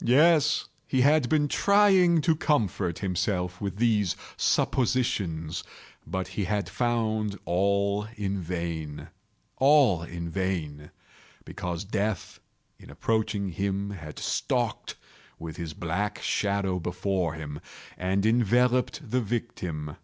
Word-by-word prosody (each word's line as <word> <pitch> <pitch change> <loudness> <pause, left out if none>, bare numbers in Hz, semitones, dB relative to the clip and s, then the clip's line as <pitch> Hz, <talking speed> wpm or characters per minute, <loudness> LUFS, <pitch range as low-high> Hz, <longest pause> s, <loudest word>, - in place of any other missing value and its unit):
Yes, 150 +4 +4 0.2
he 130 - +2
had 145 -1 +4
been 150 -2 +3
trying 190 -2 +4
to 160 +1 +3
comfort 105 - 0
himself 90 -1 -1
with 100 -2 -3
these 105 -5 +2 0.2
suppositions: 100 -11 0 0.4
but 95 0 -3
he 100 - -2
had 100 +2 -1
found 110 -4 0
all 100 +3 +1
in 100 -1 -2
vain. 85 -3 -4 0.5
All 135 - +5
in 85 0 -6
vain; 80 -6 -3 0.6
because 85 -1 -4
Death, 105 0 -2 0.4
in - - -14
approaching 110 -3 -1
him 100 +2 -2
had 80 -6 -8
stalked - - -1 0.4
with 80 -2 -7
his 80 -2 -5
black 90 +5 -2
shadow 100 -2 0
before 90 -1 -1
him, 75 -2 -6 0.4
and 95 +2 0
enveloped 125 +5 +2
the 125 +3 +1
victim. 90 -10 -4
100 Hz, 115 wpm, -27 LUFS, 90-120 Hz, 0.6 s, All